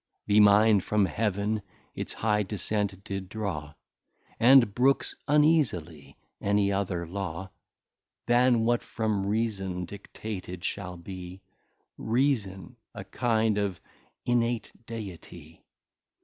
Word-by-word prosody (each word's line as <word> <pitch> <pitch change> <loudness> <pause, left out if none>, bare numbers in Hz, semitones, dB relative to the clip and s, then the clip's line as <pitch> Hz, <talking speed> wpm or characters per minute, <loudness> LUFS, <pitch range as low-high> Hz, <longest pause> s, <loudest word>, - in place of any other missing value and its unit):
The 105 0 +4
Mind 105 -1 +6
from 105 -2 +2
Heaven 105 +1 -1 0.3
its - - -5
high 105 -1 +1
Descent 100 -1 -2
did 95 -2 -5
draw, 85 -9 -4 0.6
And 120 -3 +6
brooks 135 +4 +2
uneasily 100 - +1 0.2
any 100 0 +2
other 95 -3 -1
Law, 95 0 -5 0.7
Than 120 -1 +4
what 120 0 +2
from 105 -3 -2
Reason 100 -4 -1
dictated 95 -1 -7
shall 95 -3 -4
be, 90 +1 -9 0.6
Reason, 110 -7 0 0.2
a - - -6
kind 110 -3 +1
of 100 -4 -2 0.5
In 120 0 +3
mate 115 -1 -2 0.2
Deity. 90 -7 -9
100 Hz, 105 wpm, -28 LUFS, 95-115 Hz, 0.7 s, Mind